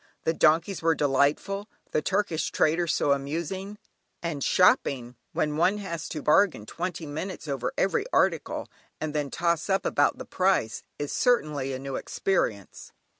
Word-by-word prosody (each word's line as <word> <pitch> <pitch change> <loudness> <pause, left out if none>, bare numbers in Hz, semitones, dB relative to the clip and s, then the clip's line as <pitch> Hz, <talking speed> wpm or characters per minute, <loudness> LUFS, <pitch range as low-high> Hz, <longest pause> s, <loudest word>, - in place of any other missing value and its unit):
The 160 - +1
donkeys 165 +4 +3
were 165 0 +3
delightful, 145 - +1 0.2
the 155 - +1
Turkish 185 -3 0
traders 165 +2 +2
so 145 - +1
amusing, 170 +8 -2 0.5
and 155 -5 -2
shopping, 140 - +3 0.2
when 150 0 -1
one 180 +5 +3
has 170 -6 -5
to 150 - -5
bargain 155 - +3
twenty 175 +4 -4
minutes 160 +4 -5
over 135 -4 -2
every 195 - +1
article, - - +1 0.3
and 155 -1 -3
then 145 -2 -1
toss 170 +2 0
up 195 0 +1
about 145 - +2
the - - -7
price, 185 - +1 0.2
is 145 -1 -4
certainly 150 - +1
a 130 - -3
new 135 0 -4
experience. 105 - -2
160 Hz, 150 wpm, -27 LUFS, 145-190 Hz, 0.5 s, donkeys